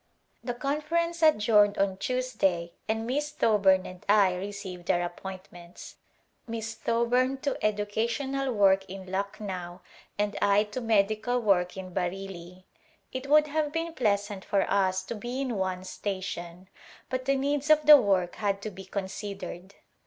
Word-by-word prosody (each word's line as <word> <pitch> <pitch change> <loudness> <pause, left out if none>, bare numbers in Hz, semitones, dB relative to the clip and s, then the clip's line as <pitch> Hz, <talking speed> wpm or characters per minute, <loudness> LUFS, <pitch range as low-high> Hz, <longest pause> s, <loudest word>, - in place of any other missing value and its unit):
The 245 -2 -3
conference 310 +5 -1
adjourned 210 -8 +4
on 195 -1 +1
Tuesday 195 -8 -1 0.2
and 220 +1 -1
Miss 290 +5 -1
Thoburn 205 -10 +3
and 185 -1 -10
I 200 -3 +5
received 190 -1 -7
our 175 - +3
appointments, 175 -1 -9 0.5
Miss 225 -1 -4
Tho 230 +1 0
burn 255 +3 +2
to 280 - -2
educational 235 +6 -1
work 195 -3 +4
in 190 -1 -8
Lucknow 190 -2 -4 0.4
and 205 0 -1
I 200 +1 +4
to 215 +4 -6
med 215 -4 +3
ical 220 +3 -1
work 185 -3 +2
in 185 -1 -7
Bareilly. 185 -1 -5 0.5
It 260 +1 -5
would 300 +1 +6
have 300 0 -1
been 330 +1 -3
pleasant 205 -5 0
for 200 -2 +1
us 190 -1 +1
to 190 - -5
be 240 +4 -5
in 260 -4 -2
one 185 -1 -2
station 185 -2 -5 0.4
but 255 0 -2
the 275 +1 +2
needs 285 +2 -1
of 305 -1 +5
the 300 0 +11
work 185 -3 +1
had 200 -2 0
to 215 - -4
be 190 0 -10
considered. 190 -1 -6
205 Hz, 155 wpm, -28 LUFS, 190-255 Hz, 0.5 s, the